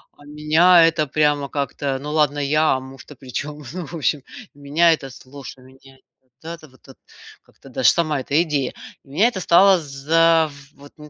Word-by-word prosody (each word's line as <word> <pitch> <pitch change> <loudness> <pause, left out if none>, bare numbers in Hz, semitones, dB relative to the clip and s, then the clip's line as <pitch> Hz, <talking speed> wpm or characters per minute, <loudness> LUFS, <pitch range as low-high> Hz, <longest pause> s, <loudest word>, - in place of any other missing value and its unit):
А 145 - -19
меня 160 +4 +4
это 160 -2 0
прямо 145 -1 0
как-то, 140 -1 -3
ну 150 - -6
ладно 150 -2 +1
я, 150 +2 +1
а 130 - -3
муж-то 135 +2 -13
причем, 145 +3 -7
ну, 180 -3 -6
в 170 - -9
общем 150 -2 -1 0.3
меня 145 +4 +1
это, 135 -4 -6
слушай, 130 0 -13
меня, 135 +1 -19 0.2
вот, 130 -1 -43
это 165 -1 -9
вот, 130 +1 -19 0.4
как-то - - -20
даже - - 0
сама 155 -4 -1
эта 140 +3 -1
идея, 145 -5 -3 0.3
меня 155 +12 +1
это 235 -6 -4
стало, 185 +1 +4
зав 160 +3 +1 0.2
вот, 145 +1 -17
м, 150 0 -12
150 Hz, 175 wpm, -20 LUFS, 140-165 Hz, 0.4 s, меня